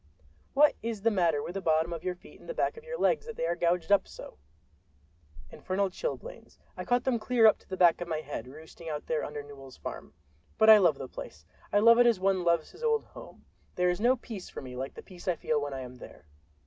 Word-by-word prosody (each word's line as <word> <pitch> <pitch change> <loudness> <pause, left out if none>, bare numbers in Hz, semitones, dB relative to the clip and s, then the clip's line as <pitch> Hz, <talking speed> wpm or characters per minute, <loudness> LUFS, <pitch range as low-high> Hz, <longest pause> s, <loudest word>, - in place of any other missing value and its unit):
"What 295 +2 +6
is 225 -3 -4
the 230 - +4
matter 170 -7 +1
with 175 - -6
the 195 - -4
bottom 160 0 +1
of 165 0 -6
your 185 -1 -2
feet - - -17
and - - -15
the - - -4
back - - 0
of 460 - -12
your - - -6
legs, 470 -1 +1
that 465 - -7
they - - -2
are 170 +1 0
gouged 170 +1 0
up 200 - +4
so?" - - -11 1.1
"Infernal 190 +1 -2
chilblains—I - - -7
caught 245 0 +1
them 250 -3 0
clear 230 +1 +3
up 215 - +6
to - - -26
the 185 - -4
back 175 -2 +4
of 175 - -4
my 160 -2 -2
head, 140 -5 -6
roosting 160 +4 -11
out 150 -1 -5
there 155 - -1
under 145 0 -5
Newell's 135 -2 -12
farm. 75 - -8 0.4
But 220 0 +7
I 215 - +9
love 165 -7 +3
the 130 - -6
place; 75 -10 -10 0.3
I - - +3
love 230 +3 +6
it 245 - +6
as 230 -5 +3
one 190 -1 +1
loves 170 -2 +1
his - - -16
old 450 -2 +1
home. - - -14 0.3
There 180 0 +2
is 180 - -4
no 245 +3 +4
peace 225 -6 -9
for - - -8
me 125 -1 -8
like 130 +2 -5
the - - -10
peace 180 -1 -14
I 180 - +2
feel 155 -2 -1
when 145 0 -4
I 135 - -5
am 125 0 -9
there." 100 - -13
180 Hz, 250 wpm, -29 LUFS, 155-230 Hz, 1.1 s, I